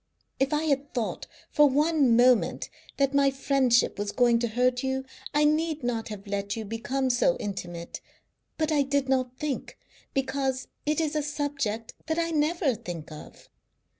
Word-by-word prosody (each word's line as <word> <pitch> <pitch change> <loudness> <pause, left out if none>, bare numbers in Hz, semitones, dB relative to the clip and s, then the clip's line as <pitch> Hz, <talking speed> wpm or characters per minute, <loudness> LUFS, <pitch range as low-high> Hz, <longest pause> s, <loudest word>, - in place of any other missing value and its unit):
If 270 +1 +1
I 300 +1 +1
had 285 -2 -1
thought 235 -3 -2 0.2
for 295 -1 +5
one 290 -3 +3
moment 245 -1 +3 0.3
that 275 0 +2
my 280 0 +4
friendship 270 -4 +2
was 205 0 -2
going 240 -2 +3
to 235 - 0
hurt 250 +2 +1
you 265 0 -2 0.3
I 295 - +2
need 310 -1 +1
not 230 -2 -1
have 210 -1 -8
let 200 0 -2
you 225 -1 -5
become 250 +5 -1
so 245 +2 +2
intimate, 175 -4 -6 0.6
but 315 0 0
I 295 -2 +3
did 280 0 0
not 255 -1 0
think, 300 -3 -4 0.4
because 270 -1 -1 0.2
it 300 +1 +2
is 315 -1 -1
a 305 - +2
subject 280 -7 -3
that 320 +1 -1
I 335 0 0
never 310 -1 +1
think 175 -8 -7
of. 155 - -12
265 Hz, 165 wpm, -27 LUFS, 235-295 Hz, 0.6 s, for